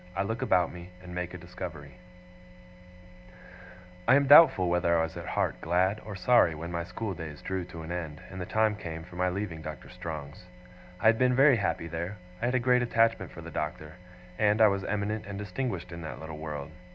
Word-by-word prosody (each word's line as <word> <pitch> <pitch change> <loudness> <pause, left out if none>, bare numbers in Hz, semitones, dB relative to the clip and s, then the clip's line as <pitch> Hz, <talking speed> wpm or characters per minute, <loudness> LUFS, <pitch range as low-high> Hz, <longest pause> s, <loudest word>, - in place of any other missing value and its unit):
I 95 - +1
LOOK 115 +6 -3
ABOUT 90 -9 +2
ME, 90 0 -10
AND 90 -1 -9
MAKE 90 0 -4
A - - -5
DISCOVERY 85 -5 -8 2.1
I 130 - +7
am 140 0 +4
doubtful 135 - +8
whether 85 -1 +2
I 80 - +2
was 80 0 -4
at - - -7
heart - - -1
glad 95 +5 +1
or 105 -2 -7
sorry, 95 -5 +4
when 85 +3 -6
my 85 0 -2
school 100 +4 -4
days 80 -5 -8
drew 95 -2 -3
to 85 -2 -9
an 80 - -7
end, 80 -4 -4
and 95 0 -6
the 90 - -5
time 110 -1 +2
came 80 -5 -6
for 90 +1 -13
my 90 +1 +1
leaving 90 -4 -4
Doctor 75 -3 -8
Strong's. 75 0 -7 0.5
I - - -5
had 110 0 +6
been 125 0 +3
very 135 -1 +6
happy 90 -5 -1
there, 85 +5 -4 0.2
I - - 0
had 125 +1 +1
a - - +4
great 125 0 +3
attachment 115 -1 +2
for - - -10
the - - -9
Doctor, 75 0 -4 0.5
and 105 0 +3
I 110 -1 +7
was 100 -1 -1
eminent 105 +1 -2
and 100 -1 -6
distinguished 100 -2 -4
in 85 0 -7
that 80 - -7
little 80 -1 -8
world. 75 -2 -6
90 Hz, 215 wpm, -29 LUFS, 80-110 Hz, 2.1 s, doubtful